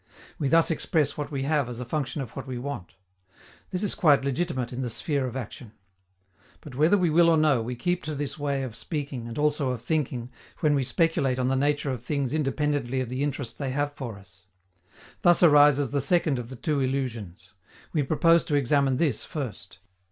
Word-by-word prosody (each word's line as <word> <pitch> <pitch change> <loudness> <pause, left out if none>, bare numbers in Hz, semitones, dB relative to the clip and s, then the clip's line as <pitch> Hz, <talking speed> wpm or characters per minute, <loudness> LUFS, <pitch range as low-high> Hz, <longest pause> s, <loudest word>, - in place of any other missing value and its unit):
We 145 - 0
thus 165 +4 +4
express 155 -2 0
what 145 -1 -4
we 140 -3 -3
have 145 -3 +1
as 120 -1 -6
a 125 - -4
function 145 +1 -2
of 120 - -11
what - - -6
we 130 -1 -4
want. 125 -8 -6 0.7
This 185 +2 -3
is 205 - +1
quite 145 -7 +4
legitimate 135 -3 -2
in 125 - -4
the 125 - -2
sphere 140 +3 -1
of 125 - -7
action. 120 -2 -7 0.9
But, 145 - -11
whether 155 +9 +4
we 175 -4 +2
will 170 +2 +5
or 165 - +4
no, 150 -6 +3
we 120 +2 -4
keep 175 +8 -1
to 155 -1 -3
this 145 +1 -4
way 140 -2 -1
of 120 -4 -6
speaking, 140 -6 -5
and 115 - -7
also 150 -2 +1
of 125 -3 -4
thinking, 130 -6 -2 0.3
when 155 -3 +3
we 140 -2 +1
speculate 145 -3 +1
on 130 0 0
the 135 - +1
nature 145 +1 +1
of 125 -4 -4
things 140 +1 -2
independently 145 -3 0
of 130 -2 -3
the 130 +2 -3
interest 140 -4 -3
they 140 -2 -2
have 145 +2 -1
for 120 -7 -6
us. 95 -2 -18 0.7
Thus 175 0 +5
arises 145 -4 +6
the 140 -1 +1
second 155 -2 +2
of 120 -1 -7
the 130 - -7
two 145 +3 -1
illusions. 125 -10 -3 0.4
We 155 - +2
propose 165 +4 +3
to 150 - 0
examine 140 -1 +2
this 145 -7 0
first. 135 - -6
140 Hz, 205 wpm, -26 LUFS, 125-150 Hz, 0.9 s, arises